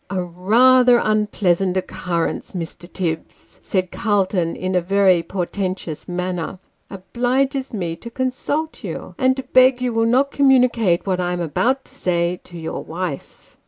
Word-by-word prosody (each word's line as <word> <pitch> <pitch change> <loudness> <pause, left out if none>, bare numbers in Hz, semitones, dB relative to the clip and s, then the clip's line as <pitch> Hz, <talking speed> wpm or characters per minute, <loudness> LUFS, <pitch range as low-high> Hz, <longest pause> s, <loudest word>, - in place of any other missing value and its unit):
" - - -42
A 190 -2 -1
rather 240 +8 +4
unpleasant 195 -4 +1
occurrence, 175 -1 -3
Mr. 175 +1 -6
Tibbs," 165 -4 -5
said 185 -2 -1
Calton, 195 -6 0
in 185 0 -3
a 180 - +2
very 190 -1 +3
portentous 185 -2 -4
manner, 180 0 -3 0.2
" - - -45
obliges 255 +7 -1
me 175 -6 -3
to 235 - -9
consult 270 +5 -3
you, - - -6
and 260 -1 +3
to 265 - -4
beg 255 0 +4
you 250 -1 -1
will 225 0 +2
not 265 +4 +2
communicate 245 -10 +3
what 185 -2 0
I 180 0 -1
am 180 - -3
about 240 - 0
to - - -14
say, 175 0 -1
to 175 - -11
your 160 -1 -5
wife." 170 -4 -6
190 Hz, 160 wpm, -20 LUFS, 175-250 Hz, 0.2 s, rather